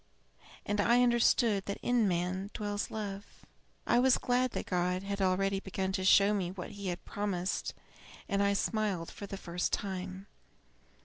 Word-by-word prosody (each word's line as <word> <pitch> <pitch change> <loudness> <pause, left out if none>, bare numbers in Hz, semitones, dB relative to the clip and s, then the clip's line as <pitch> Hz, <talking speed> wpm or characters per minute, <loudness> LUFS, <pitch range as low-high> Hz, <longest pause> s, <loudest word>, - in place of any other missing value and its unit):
And 205 0 +1
I 240 +3 +4
understood 235 -4 +3
that 200 - -2
in 245 -3 +3
man 185 +2 -1
dwells 205 -1 -2
Love! 205 -2 -4 0.6
I 240 - +4
was 260 0 +5
glad 250 +1 +1
that - - -3
God 180 +1 0
had 200 0 -3
already 195 +1 +2
begun 190 0 -3
to 190 -1 -2
show 200 +2 +6
me 190 -4 -1
what 180 +1 -7
He 200 -1 -6
had 175 -1 -4
promised, 195 -3 -2 0.5
and 200 -1 +1
I 200 0 +3
smiled 200 -5 -1
for 200 - -8
the 195 - -6
first 175 -1 -2
time. 190 -1 -3
200 Hz, 165 wpm, -32 LUFS, 185-210 Hz, 0.6 s, show